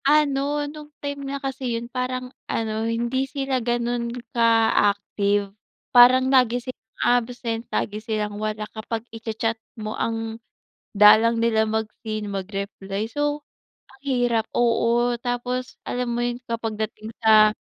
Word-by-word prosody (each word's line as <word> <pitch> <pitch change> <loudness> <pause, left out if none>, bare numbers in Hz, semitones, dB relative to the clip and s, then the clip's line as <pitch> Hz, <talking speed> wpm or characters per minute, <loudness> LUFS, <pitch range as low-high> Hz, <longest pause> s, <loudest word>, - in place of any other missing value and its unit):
Ano, 290 0 +2
nung 300 0 -9
time 285 -1 -5
nga 280 - -2
kasi 265 -3 -3
yun, 230 - -5
parang 255 +1 -4 0.2
ano, 220 0 -1
hindi 240 +4 -1
sila 270 -2 -1
ganun 240 0 -1 0.2
ka 230 -1 +4 0.2
active. 200 0 -1 0.4
Parang 250 +1 +8
lagi 250 -2 +4
silang 245 -3 -10
absent, 240 -1 0
lagi 210 +1 -2
silang 210 -1 -3
wala, 215 0 -2
kapag 225 +1 -4
i-chachat 225 0 -3 0.2
mo 215 -1 -4
ang 225 0 -3 0.6
dalang 220 +3 +7
nila 220 -1 +2
mag-seen, 215 -1 -3
mag-reply. 195 +1 -4
So, 290 0 -1 0.5
ang 265 - -21
hirap, 245 -4 +1
oo, 240 0 +3
tapos 250 +1 -3
alam 245 -1 -2
mo 240 - 0
yun, 240 0 -3
kapag 225 -2 -2
dating 215 +1 -5
sa 215 -1 +6
235 Hz, 130 wpm, -24 LUFS, 220-255 Hz, 0.6 s, Parang